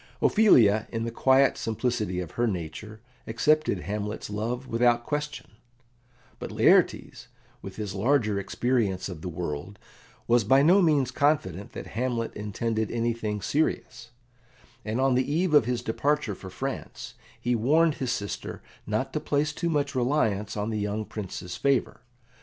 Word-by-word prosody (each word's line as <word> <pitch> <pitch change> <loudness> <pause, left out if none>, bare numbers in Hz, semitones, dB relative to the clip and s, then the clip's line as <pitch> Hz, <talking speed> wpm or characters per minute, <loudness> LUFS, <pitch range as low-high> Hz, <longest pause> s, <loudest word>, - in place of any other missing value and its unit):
Ophelia, 110 - +5
in 115 -1 -2
the 115 - -3
quiet 130 +3 +3
simplicity 110 -5 -2
of 85 - -7
her 120 0 0
nature, 105 +4 -5 0.3
accepted 130 - +1
Hamlet's 105 +2 -4
love 115 +5 -3
without 120 -1 +2
question; 150 0 -4 0.9
but - - -6
Laertes, - - +2 0.3
with 95 -1 -9
his 105 -2 -5
larger 105 -1 +1
experience 100 -1 -1
of 85 -4 -8
the 90 - -5
world, 85 +3 -5 0.5
was 120 0 +4
by 135 +6 +4
no 180 +6 +6
means 145 -7 +2
confident 120 - 0
that - - -7
Hamlet 120 -1 -2
intended 110 +1 -2
anything 115 -3 -2
serious, 125 -5 -1 0.7
and 110 +3 -2
on 135 0 +3
the 130 +2 +1
eve 170 +2 +1
of 145 -7 +6
his 120 0 -2
departure 140 0 0
for 95 0 -10
France 135 +8 -6 0.3
he 125 - 0
warned 150 +8 +3
his 130 -2 0
sister 100 -4 -5 0.2
not 110 +5 -2
to 155 - 0
place 150 0 0
too 170 +2 -2
much 145 -3 0
reliance 115 -6 0
on 105 +2 -2
the 110 - -2
young 105 +1 -2
Prince's 95 -4 -6
favour. 140 -3 0
115 Hz, 150 wpm, -27 LUFS, 105-135 Hz, 0.9 s, no